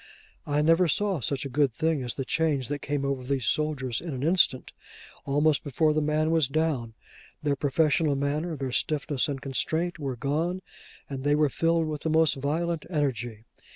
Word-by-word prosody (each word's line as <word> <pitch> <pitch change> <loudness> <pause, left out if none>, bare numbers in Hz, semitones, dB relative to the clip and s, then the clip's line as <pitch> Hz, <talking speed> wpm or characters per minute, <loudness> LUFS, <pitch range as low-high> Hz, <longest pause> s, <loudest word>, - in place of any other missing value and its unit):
I 145 0 +1
never 165 +3 +4
saw 195 +2 +1
such 140 +3 -2
a - - -1
good 140 0 +2
thing 160 -3 0
as 120 -2 -4
the 135 - -3
change 145 -5 0
that 145 -1 -3
came 145 -1 -2
over 135 -2 -2
these 130 -2 -1
soldiers 140 -6 0
in 165 -5 -5
an 130 - -4
instant. 160 -6 +3 0.5
Almost 145 +2 +2
before 155 +2 +1
the 155 - +1
man 155 +1 +1
was 160 -4 +3
down, 140 -6 -1 0.5
their 145 -1 +1
professional 150 +1 +2
manner, 150 +4 -1
their 135 -3 -4
stiffness 145 +1 0
and 140 -2 -3
constraint, 160 +6 -1
were 135 -4 -3
gone, 165 +8 -1 0.4
and 135 -2 -6
they 145 +1 +3
were 150 -1 +3
filled 165 +3 +1
with 155 -2 -4
the 160 - -1
most 160 -1 +4
violent 160 +4 -1
energy. 120 - -2
145 Hz, 185 wpm, -27 LUFS, 135-160 Hz, 0.5 s, never